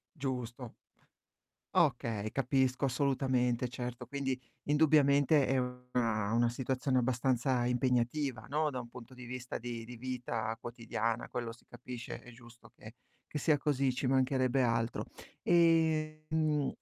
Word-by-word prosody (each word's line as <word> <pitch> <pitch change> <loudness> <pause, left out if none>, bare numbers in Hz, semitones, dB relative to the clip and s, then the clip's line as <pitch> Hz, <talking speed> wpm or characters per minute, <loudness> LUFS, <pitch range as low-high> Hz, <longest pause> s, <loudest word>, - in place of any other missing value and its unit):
Giusto. 125 -3 -4 1.0
Okay, 110 -2 +2
capisco 130 0 +1
assolutamente, 130 -2 +1
certo. 125 0 -5
Quindi 135 0 -2 0.3
indubbiamente 145 -1 +4
è 135 - +2
una 125 -4 -1
una 120 0 +3
situazione 130 +1 -1
abbastanza 125 0 +1
impegnativa, 125 +2 0
no, 150 +1 +1
da 125 -1 -3
un 120 - -11
punto 125 +1 -11
di 125 0 -11
vista 125 +1 -5
di 115 -1 -6
di 120 +1 -9
vita 115 -2 -3
quotidiana, 115 -1 -3
quello 120 -2 -4
si 115 - -20
capisce, 120 0 -8
è 120 - -13
giusto 120 0 -16
che 110 +3 -12 0.4
che 150 - -2
sia 150 0 +3
così, 140 -3 +1
ci 130 - -3
mancherebbe 130 0 +2
altro. 115 -1 0 0.4
Ehm 155 -3 +2
125 Hz, 130 wpm, -33 LUFS, 120-140 Hz, 1.0 s, indubbiamente